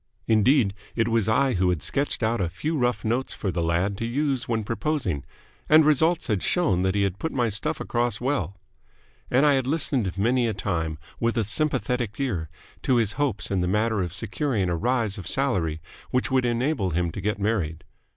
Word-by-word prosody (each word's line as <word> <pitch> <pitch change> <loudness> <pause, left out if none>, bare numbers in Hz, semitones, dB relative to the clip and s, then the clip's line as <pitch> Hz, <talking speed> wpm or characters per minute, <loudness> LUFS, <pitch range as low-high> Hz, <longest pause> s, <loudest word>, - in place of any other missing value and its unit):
Indeed, 110 -1 +3 0.2
it 115 -1 +1
was 115 -2 +1
I 130 +3 +3
who 90 -1 +2
had 90 -4 -1
sketched 140 -3 -1
out 110 -1 +1
a 85 - 0
few 150 - -3
rough 125 -4 0
notes 120 +4 0
for 95 - -3
the 85 - -2
lad 85 +4 0
to 115 - -1
use 135 +1 -1
when 110 -2 0
proposing; 115 - -2 0.5
and 155 0 +7
results 160 +3 +3
had 105 -5 0
shown 160 - +1
that 95 +1 +1
he 100 - +2
had 100 -1 -1
put 160 - -2
my 120 -3 +1
stuff 105 -1 -2
across 120 -2 -1
well. 120 - -1 0.7
And 130 +4 +4
I 145 - +5
had 130 -2 +1
listened 130 - 0
many 120 +4 +2
a 110 - -2
time 80 -5 -2 0.2
with 115 0 0
a 115 - +2
sympathetic 125 -1 -1
ear 95 - -2 0.3
to 130 - +2
his 115 -4 +2
hopes 125 -5 -1
in 95 -2 +1
the 90 - 0
matter 105 +2 +1
of 90 -2 -2
securing 100 - -1
a - - +1
rise 115 0 0
of 90 - -7
salary 90 - 0 0.3
which 125 +1 0
would 130 -1 +2
enable 120 -3 0
him 85 0 0
to 100 - -6
get 105 +1 -1
married. 100 -7 -1
115 Hz, 200 wpm, -25 LUFS, 95-130 Hz, 0.7 s, and